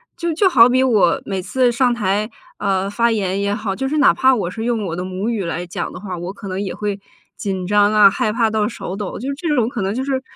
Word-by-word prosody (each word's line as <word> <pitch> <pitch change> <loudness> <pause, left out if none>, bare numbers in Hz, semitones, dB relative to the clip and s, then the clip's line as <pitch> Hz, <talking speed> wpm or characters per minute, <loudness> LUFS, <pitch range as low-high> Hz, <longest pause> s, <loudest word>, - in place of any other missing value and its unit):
就 340 -1 -2
就 380 +4 +3
好 245 -8 +6
比 255 +1 +3
我 215 -9 +3
每 195 -2 -3
次 250 +6 +1
上 245 0 +2
台， 210 -1 -1 0.3
呃， 195 0 0
发 230 +3 +1
言 195 -3 -1
也 200 0 0
好， 205 -2 -3
就 265 +6 -2
是 305 - -1
哪 285 - +5
怕 260 0 +4
我 200 -7 -1
是 220 +4 -6
用 230 -3 -1
我 165 -2 -3
的 180 - -4
母 185 +4 -3
语 220 -5 -2
来 170 +1 -3
讲 175 - -5
的 - - -9
话， 185 -3 -6
我 175 +2 -5
可 200 0 -10
能 190 +1 -3
也 195 - -4
会 205 -1 -3 0.4
紧 190 -2 -3
张 205 +1 +3
啊， 210 -2 +7
害 210 +1 -1
怕 230 -2 +2
到 215 -1 0
手 195 -5 -6
抖， 205 -3 -5
就 250 - -6
这 330 +3 -5
种 235 -3 +2
可 235 - -4
能 195 +3 -1
就 260 - -2
是 265 -1 -1
210 Hz, 285 characters per minute, -19 LUFS, 195-240 Hz, 0.4 s, 啊